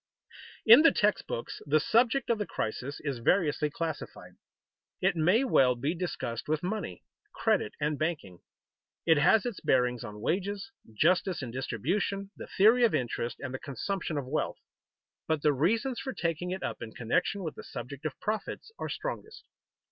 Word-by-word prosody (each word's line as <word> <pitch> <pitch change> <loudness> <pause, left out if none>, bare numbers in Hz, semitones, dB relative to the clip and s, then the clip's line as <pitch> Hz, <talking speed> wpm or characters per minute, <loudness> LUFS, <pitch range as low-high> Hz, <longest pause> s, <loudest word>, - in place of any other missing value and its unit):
_ - - -24 0.3
In 230 +6 +10
the 325 - +7
text 210 0 +1
books 115 - -5
the 155 +2 +4
subject 235 - +2
of 225 - +1
the 210 - -2
crisis 125 +5 -4
is 140 -5 -3
variously 150 +1 +2
classified. 160 0 -5 0.7
It 190 0 +2
may 180 +10 +3
well 130 - +4
be 140 +7 -1
discussed 165 -10 -4
with 155 +1 0
money, 185 - -4 0.3
credit, 105 - +1
and 150 0 -1
banking. 150 - -3 0.7
It 160 -2 +5
has 205 +9 +4
its 240 -6 -3
bearings 125 -2 +2
on 105 -2 -8
wages, 200 - -2 0.2
justice 170 - +2
in 120 - -5
distribution, 175 - -2
the - - -9
theory 225 +5 +5
of 230 - +4
interest, 120 -1 -2
and 130 -2 -5
the 130 - -4
consumption 160 +3 -3
of 140 - -2
wealth. 140 +5 -2 0.7
But 160 -2 0
the 150 - +4
reasons 225 - +1
for 265 - -4
taking 170 +1 -2
it 185 +1 -4
up - - -4
in 110 - -7
connection 125 - 0
with 160 - -3
the - - -10
subject 135 +4 -8
of 155 -4 -4
profits 215 - -4
are - - -3
strongest. - - -6
160 Hz, 170 wpm, -29 LUFS, 130-200 Hz, 0.7 s, In